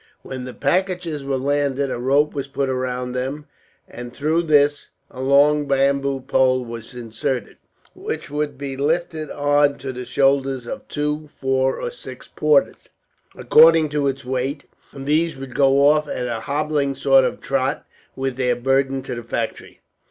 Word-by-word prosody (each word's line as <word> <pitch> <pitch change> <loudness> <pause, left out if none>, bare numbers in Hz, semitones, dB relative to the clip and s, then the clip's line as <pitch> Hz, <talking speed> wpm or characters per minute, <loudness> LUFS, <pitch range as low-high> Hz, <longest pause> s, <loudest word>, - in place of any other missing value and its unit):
When 130 -1 -6
the 125 - -7
packages 175 -1 -1
were 135 -1 -1
landed 140 0 0
a - - -3
rope 140 +4 +2
was 140 -1 -4
put 140 0 -2
round 125 -1 -2
them, 135 +4 -4 0.4
and 120 0 -9
through 155 +6 0
this 145 -3 +2 0.2
a 130 - -8
long 145 +2 +4
bamboo 140 0 +1
pole 130 -1 +2
was 115 +1 -9
inserted, 120 +2 -4 0.4
which - - -5
would 145 -2 -2
be 140 -1 -5
lifted 155 +2 -1
on 145 0 +2
to 135 -1 -6
the 125 0 -6
shoulders 135 -1 +1
of - - -7
two, 150 0 -3
four, 130 0 +1
or 485 - -4
six - - -10
porters, - - +1 0.5
according 160 0 +6
to 145 -1 0
its 135 0 -3
weight; 130 +3 -2 0.3
and 135 -1 -9
these 160 +2 +1
would 135 -1 -8
go 135 +1 +4
off, 150 0 +3
at 125 - -3
a 120 -2 -3
hobbling 145 0 -1
sort 135 0 +4
of - - -2
trot, 135 +1 -1 0.3
with 135 -1 -3
their 125 -2 +1
burden 135 +1 0
to - - -5
the 120 - -5
factory. 115 0 -5
135 Hz, 165 wpm, -21 LUFS, 130-145 Hz, 0.5 s, according